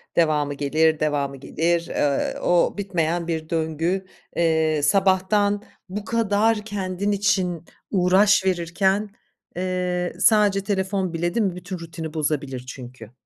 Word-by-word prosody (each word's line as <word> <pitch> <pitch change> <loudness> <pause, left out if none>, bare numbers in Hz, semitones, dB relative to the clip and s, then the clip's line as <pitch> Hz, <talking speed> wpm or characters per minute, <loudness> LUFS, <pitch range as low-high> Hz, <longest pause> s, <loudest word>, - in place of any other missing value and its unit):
devamı 150 -3 +2
gelir, 155 +2 +2
devamı 140 -2 -1
gelir, 170 +5 -1
eee, 140 -1 0
o 175 +2 +2
bitmeyen 175 -4 -1
bir 160 -2 -3
döngü. 165 +3 -1 0.3
Eee, 160 -2 +2
sabahtan 195 +4 +2 0.3
bu 205 +2 -5
kadar 220 -1 +1
kendin 200 -1 -2
için 190 -4 0 0.3
uğraş 190 +1 +4
verirken, 190 +3 +1 0.5
eee, 180 -1 -1
sadece 205 -3 +4
telefon 190 -2 -1
bile 175 +1 -1
değil 230 - +2
mi 185 -3 -1
bütün 180 0 -7
rutini 165 -1 -7
bozabilir 145 -5 -2
çünkü. 125 -3 -10
180 Hz, 120 wpm, -23 LUFS, 160-195 Hz, 0.5 s, uğraş